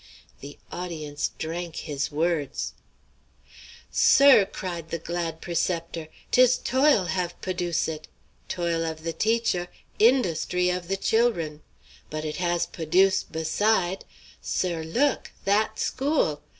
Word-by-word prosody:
The 145 +1 -10
audience 155 -5 -4
drank 165 +1 -4
his 145 -3 -3
words. 155 -1 -1 1.2
"Sir," 275 -8 +6
cried 170 -3 -6
the 165 - -2
glad 165 0 -4
preceptor, 170 -1 -2 0.2
"'tis 250 0 +5
toil 260 -4 +3
have 175 -1 -2
p'oduce 175 -3 -1
it! 155 -1 -6 0.4
Toil 170 -2 -1
of 160 -1 -4
the 165 0 -2
teacher, 220 -5 +1 0.3
in_dust_ry 180 -6 +3
of 180 -1 -6
the 195 +1 -1
chil'run! 190 -10 +1 0.5
But 155 0 -4
it 150 - -4
has 175 -1 0
p'oduce' 185 +4 +2
beside! 180 +3 +1 0.4
Sir, 175 -3 -1
look 240 - 0
that 210 +2 +2
school! 260 - 0
175 Hz, 115 wpm, -26 LUFS, 160-195 Hz, 1.2 s, Sir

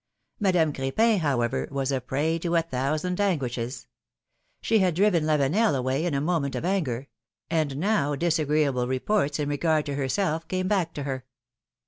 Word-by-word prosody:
Madame 180 -7 +2
Cr^pin, 205 +12 +2
however, 130 -7 0
was 140 0 -2
a 130 -1 0
prey 150 +6 -1
to 170 +1 -1
a 165 - +3
thousand 155 +6 -1
anguishes. 130 -10 -2 0.7
She 225 -1 +2
had 185 -4 +2
driven 180 -4 +3
Lavenel 155 +6 +2
away 130 +4 0
in 170 -5 0
a - - +1
moment 150 -2 -1
of - - -3
anger 140 -10 -1 0.2
— - - -60
and 155 -4 0
now 155 -5 +1
disagreeable 150 -5 +1
reports 145 +4 0
in 150 -2 -1
regard 155 +1 +1
to 145 - -3
her 135 -1 -2
self 165 0 -1
came 185 +1 -1
back 185 -5 0
to 145 - -4
her. 130 -2 -4
155 Hz, 170 wpm, -26 LUFS, 135-175 Hz, 0.7 s, a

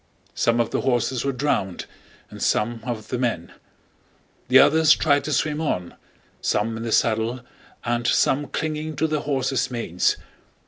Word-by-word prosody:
Some 115 0 +1
of 115 - 0
the - - 0
horses 120 -1 0
were 140 - 0
drowned 125 -9 -1 0.5
and - - -10
some 115 +2 +1
of 115 -3 -5
the 125 - -2
men; 115 -9 -2 1.0
the - - +6
others 160 0 +6
tried 145 -2 +2
to 155 - -3
swim 150 +1 0
on, 90 - -2 0.5
some 110 +2 0
in 115 - -6
the 115 -1 -3
saddle 115 +1 +1 0.4
and 120 0 0
some 145 +2 +2
clinging 155 0 -3
to 155 - 0
their 155 -1 0
horses' 135 -3 -1
manes. 115 -8 0
125 Hz, 155 wpm, -23 LUFS, 115-145 Hz, 1.0 s, the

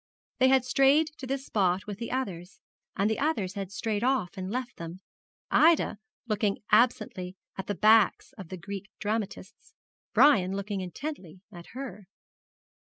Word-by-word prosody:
They 260 - +6
had 260 -1 +4
strayed 275 +4 +4
to 260 - -6
this 270 +1 -3
spot 185 -3 +1
with 205 -1 -7
the 230 - -4
others; 195 -9 -4 0.4
and 200 +1 +1
the 220 - -1
others 245 -12 0
had 195 -2 -5
strayed 215 +1 -2
off 250 -9 +1
and 185 0 -5
left 240 +2 -4
them, 170 +1 -7 0.5
Ida 320 - +4 0.3
looking 210 -2 0
absently 215 -5 +2 0.2
at 190 - -6
the 205 - -2
backs 215 +4 +4
of 190 -10 -10
the 185 - -6
Greek 195 +3 -7
dramatists, 205 -3 -5 0.4
Brian 195 -10 +5
looking 200 0 -3
intently 185 - -7
at 175 -3 -11
her. 250 -7 -7
210 Hz, 155 wpm, -28 LUFS, 190-255 Hz, 0.5 s, They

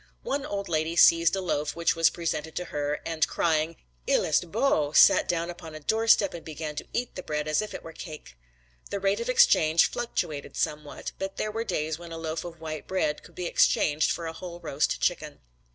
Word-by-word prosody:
One 280 +1 -2
old 200 -1 -3
lady 160 0 -1
seized 170 +1 +6
a 190 - -2
loaf 150 -5 -2
which 170 0 +1
was 165 0 +4
presented 160 -2 -3
to 180 - -3
her 145 0 -2
and 160 -2 +1
crying 160 0 0 0.3
"il - - +3
est 160 +2 +1
beau," 200 - +1
sat - - +6
down 170 0 -1
upon 165 -2 -10
a - - -7
doorstep 220 +3 +3
and 170 - -8
began 155 -1 -6
to - - -5
eat 245 0 -2
the 185 - -6
bread 150 -2 -3
as 155 +5 +2
if 215 - -6
it - - -7
were 165 - -9
cake. 155 - -10 0.5
The 200 - -3
rate 195 +1 +1
of 485 - -3
exchange 170 - +5
fluctuated 160 -11 -3
somewhat 150 -1 -3
but 195 0 -4
there 215 - -2
were 225 +2 -2
days 160 -6 -2
when 170 -1 -10
a 165 - -5
loaf 160 0 -4
of 170 -2 -9
white 155 -1 -6
bread 155 -6 -1
could - - -17
be 180 - -4
exchanged 150 -2 +3
for 170 - -3
a 165 - -4
whole 175 0 -8
roast 140 -3 -1
chicken. 155 -4 -1
165 Hz, 215 wpm, -27 LUFS, 155-185 Hz, 0.5 s, seized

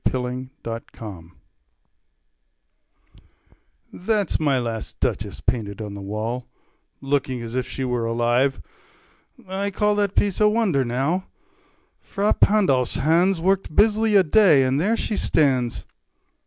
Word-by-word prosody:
MY - - 0
LAST 125 +1 -5
DUCHESS 115 0 -6
Ferrara 100 -7 -8 2.7
That's 205 -1 -1
my 145 -4 +2
last 115 -3 -4
Duchess - - -2
painted 105 -4 -2
on 105 -2 -6
the 100 - -8
wall, 110 +5 -4 0.5
Looking 135 -3 -1
as 115 0 -7
if 130 0 -2
she 135 - -4
were 125 -2 -1
alive. 120 +4 +1 0.9
I 195 +2 -2
call 210 +1 +1
That 205 -2 0
piece 200 0 +1
a 210 - +6
wonder, 210 - +1
now: 135 +10 -1 0.7
Fra 205 +1 0
Pandolf's 140 - +2
hands 170 +6 +2
Worked 190 -2 0
busily 215 0 +3
a 195 - +7
day, 165 -5 +5
and 130 +3 +1
there 220 +6 +1
she 215 - -2
stands. 130 -10 +1
135 Hz, 130 wpm, -23 LUFS, 120-195 Hz, 2.7 s, a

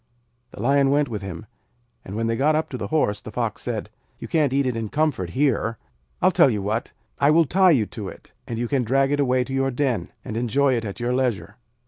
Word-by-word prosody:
The - - -13
Lion 135 +4 +3
went 145 -1 +2
with 105 -3 -4
him, 95 +1 -7 0.6
and 95 - -8
when 115 +1 -1
they 115 0 0
got 150 +6 +2
up 155 - -1
to - - -5
the - - -3
Horse, 105 -10 0
the - - -9
Fox - - -2
said: - - -4 0.3
'You - - -8
can't 150 -5 +2
eat 140 +1 +1
it 125 -2 -1
in 115 -2 -3
comfort 145 - 0
here. 120 -5 +1 0.5
I'll - - +6
tell - - +5
you 105 -5 -2
what. 110 +4 -2 0.3
I 140 - +4
will 165 +2 +5
tie 185 +4 +4
it 110 -7 0
to 105 - -6
you, - - -7 0.3
and 115 - -4
you 120 +1 -1
can 130 0 +1
drag 135 +4 +2
it 145 - +1
away 130 -2 +2
to 135 - -7
your 135 0 +1
den, 130 -2 -1
and 110 - -4
enjoy 130 +4 +2
it 115 -2 -1
at 100 +2 -6
your 120 +1 -1
leisure.' 125 -5 -1
125 Hz, 240 wpm, -23 LUFS, 115-140 Hz, 0.6 s, I'll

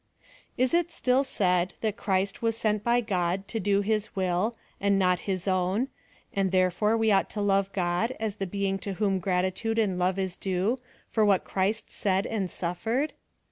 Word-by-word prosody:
Is 255 +3 +2
it 345 0 +3
still 260 -4 +2
said, 180 -8 +1
that 215 -2 0
Christ 195 0 -1
was 225 -1 0
sent 215 -2 0
by 240 +1 +3
God, 190 -2 -1
to 225 - -2
do 200 0 +2
Ilis 215 0 0
will, 190 +4 0 0.2
and 200 0 +2
not 180 -2 +3
his 185 0 -2
own; 190 +7 +1 0.4
and 195 -2 +1
therefore 185 +4 +2
we 225 -1 +3
ought 195 - +3
to 210 - -5
love 195 -1 +2
God, 185 +6 0
as 220 -2 -2
the 195 - -2
being 195 +1 -1
to 200 +1 -4
whom 195 -1 +1
gratitude 185 +4 0
and 195 -5 +1
love 185 +1 +1
is 190 -2 -2
due, 195 +6 0 0.3
for 220 - +3
what 200 -3 +4
Christ 205 +3 -1
said 195 -1 0
and 200 -5 -2
suffered 225 - -1
200 Hz, 180 wpm, -27 LUFS, 185-220 Hz, 0.4 s, what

